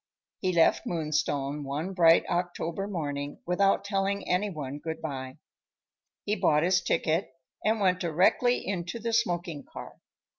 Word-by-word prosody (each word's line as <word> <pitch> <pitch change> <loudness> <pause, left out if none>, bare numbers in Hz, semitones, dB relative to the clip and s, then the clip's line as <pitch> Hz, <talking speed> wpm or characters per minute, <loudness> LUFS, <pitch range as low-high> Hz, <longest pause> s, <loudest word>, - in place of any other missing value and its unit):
He 185 - 0
left 170 -2 +3
Moonstone 150 -3 -1
one 150 +7 -3
bright 170 -2 +5
October 175 +1 -2
morning, 145 -6 -4
without 195 +3 +2
telling 200 0 -1
any 190 +3 +1
one 145 -5 -6
good 160 +1 -5
bye. 135 -3 -6 0.9
He 210 - 0
bought 150 -7 +3
his 180 +1 +3
ticket 165 +4 0 0.3
and 220 +1 +2
went 185 -2 +2
directly 185 +9 +2
into 180 +1 -3
the 230 0 -3
smoking 175 -9 0
car. - - -10
175 Hz, 140 wpm, -28 LUFS, 155-195 Hz, 0.9 s, bright